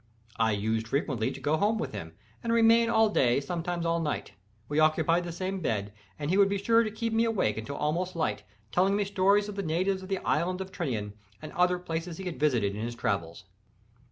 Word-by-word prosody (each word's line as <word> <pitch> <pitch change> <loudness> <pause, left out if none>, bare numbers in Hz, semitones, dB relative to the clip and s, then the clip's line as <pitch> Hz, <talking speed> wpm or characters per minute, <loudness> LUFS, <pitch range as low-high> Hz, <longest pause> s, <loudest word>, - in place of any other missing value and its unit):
I 115 -1 +3
used 110 +2 -1
frequently 130 -3 0
to - - -7
go 145 +4 +1
home 210 +5 +2
with 225 - -3
him, 80 -6 -7 0.3
and 230 - -1
remain 230 0 +5
all 220 -1 +4
day, 125 -11 +3
and 140 - -1
sometimes 170 +1 -3
all 165 0 +1
night. 155 -3 -3 0.4
We 145 +3 0
occupied 160 +2 +3
the 170 - -4
same 185 +3 -3
bed, 105 - -2 0.2
and 150 +2 -2
he 190 - +3
would 200 -1 +6
be 200 - 0
sure 230 +4 +4
to 215 - -2
keep 225 +1 -3
me 225 +1 +3
awake 215 - +1
until 125 +6 -6
almost 175 +6 -1
light, 160 -11 -1 0.3
telling 190 +5 +3
me 205 0 +1
stories 200 +1 +3
of 210 - -6
the - - 0
natives 185 +3 0
of 185 - -10
the 195 - 0
Island 180 +2 +1
of 190 0 -6
Tinian, 115 - -3 0.3
and 155 - -8
other 180 0 +2
places 165 -1 -4
he 190 - -6
had 180 -3 -5
visited 120 -10 +2
in 105 - -5
his 120 +1 -4
travels. 85 -8 -2
170 Hz, 225 wpm, -28 LUFS, 135-195 Hz, 0.4 s, would